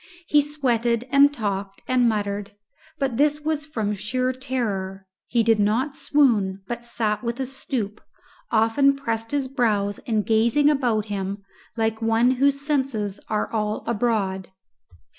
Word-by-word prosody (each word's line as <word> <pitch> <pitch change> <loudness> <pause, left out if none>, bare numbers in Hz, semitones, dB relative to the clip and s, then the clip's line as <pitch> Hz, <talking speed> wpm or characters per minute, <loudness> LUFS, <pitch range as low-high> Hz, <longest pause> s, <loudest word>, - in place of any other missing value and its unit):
He 295 -2 +4
sweated 245 -5 0
and 280 +1 +6
talked 200 -6 -4
and 250 -2 +3
muttered, 205 -1 -2 0.4
but 265 -4 -1
this 295 +2 +2
was 305 -1 -2
from 220 -8 -2
sheer 255 +5 -1
terror; 205 -8 -3 0.2
he 235 -1 +2
did 225 -1 +3
not 230 +8 +1
swoon, 210 -10 +2
but 240 0 -4
sat 220 -2 -1
with 235 +1 -3
a 265 - -1
stoop, 245 -5 -4 0.5
often 230 +5 +3
pressing 230 0 -2
his 270 -2 -1
brows 210 -7 0
and 220 -3 +1
gazing 235 +7 +3
about 240 -7 +1
him 200 -1 -4 0.3
like 225 0 0
one 225 +2 +3
whose 275 +2 +2
senses 265 -9 -1
are 215 +1 -1
all 210 -1 -1
abroad. 210 -5 0
230 Hz, 140 wpm, -24 LUFS, 210-265 Hz, 0.5 s, and